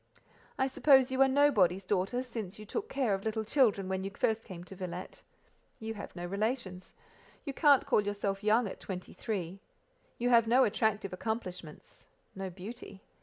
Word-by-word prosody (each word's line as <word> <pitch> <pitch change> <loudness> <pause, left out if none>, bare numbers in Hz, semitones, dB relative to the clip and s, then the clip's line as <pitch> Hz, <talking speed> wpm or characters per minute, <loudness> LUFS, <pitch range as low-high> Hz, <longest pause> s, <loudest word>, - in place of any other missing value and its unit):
"I 265 - +2
suppose 265 -1 +4
you 260 +1 +1
are 270 - +7
nobody's 220 -10 +3
daughter, 195 +6 0
since 220 -6 -6
you 215 - -10
took 435 - -4
care 260 -6 0
of 195 0 -2
little 220 0 -1
children 215 -6 +2
when 190 0 -2
you 195 - -3
first 220 +2 -1
came 180 -4 -8
to 185 +2 -11
Villette: 180 -1 -7 0.6
you 225 0 -4
have 205 - -9
no 175 0 -5
relations; 200 -1 -3 0.5
you 280 - -4
can't 285 -2 +5
call - - +3
yourself 200 -1 -3
young 220 +2 +3
at - - -8
twenty 185 -2 -7
three; 190 -3 -4 0.6
you 245 +1 0
have 230 -2 +5
no 250 +3 +5
attractive 210 -3 0
accomplishments—no 190 -2 -7
beauty. 195 +2 -10
210 Hz, 170 wpm, -31 LUFS, 190-245 Hz, 0.6 s, are